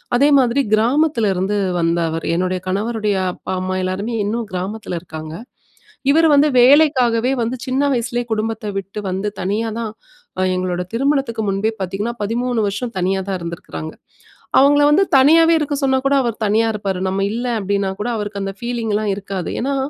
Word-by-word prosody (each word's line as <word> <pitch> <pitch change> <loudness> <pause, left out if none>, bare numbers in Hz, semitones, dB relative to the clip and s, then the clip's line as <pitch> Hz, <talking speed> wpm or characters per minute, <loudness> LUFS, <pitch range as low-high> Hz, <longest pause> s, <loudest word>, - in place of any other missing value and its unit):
அதே 280 +4 +4
மாதிரி 255 +2 +2
கிராமத்துல 240 0 +2
இருந்து 190 +3 -1 0.2
வந்த 170 0 +1
அவரு 165 0 -4
என்னுடைய 185 +1 -1
கணவருடைய 210 +2 -1 0.2
அப்பா, - - -8
அம்மா 185 0 -2
எல்லாருமே 200 +5 -2
இன்னும் 225 +2 -2
கிராமத்துல 185 +1 -4
இருக்காங்க. 155 -2 -8 0.8
இவரு 325 +2 +4
வந்து 285 +2 +5
வேலைக்காகவே 255 -3 +4
வந்து 235 +3 -2
சின்ன 260 +2 0
வயசுலேயே 240 0 -2
குடும்பத்த 220 -1 -2
விட்டு 195 +2 -5
வந்து 190 +3 -2
தனியா 210 +5 -1
தான், 225 -2 -3 0.5
அ - - +1
எங்களோட 180 -1 -2
திருமணத்துக்கு 270 -3 0
முன்பே 195 +3 0
பாத்தீங்கன்னா, 200 +6 -3
13 235 +2 -1
வருஷம் 230 +4 -4
தனியா 190 +2 0
தான் 190 -2 -2
இருந்திருக்காங்க. 170 -2 -7 0.7
அவுங்கல 290 +2 +5
வந்து 385 +6 +4
தனியாவே 325 +4 +6
இருக்க 295 -1 -1
சொன்னாகூட 270 +1 +2
அவர் 230 -2 -3
தனியா 225 +2 +2
இருப்பாரு. 195 -3 -3
நம்ப 195 +1 -1
இல்ல, 240 +2 -3 0.2
அப்பிடின்னா 200 0 -1
கூட 240 - -2
அவருக்கு 205 -1 -4
அந்த 195 - -4
ஃபீலிங்லாம் 225 -4 -1
இருக்காது. 195 -3 -5
ஏன்னா, 275 +2 -1
220 Hz, 155 wpm, -19 LUFS, 195-250 Hz, 0.8 s, தனியாவே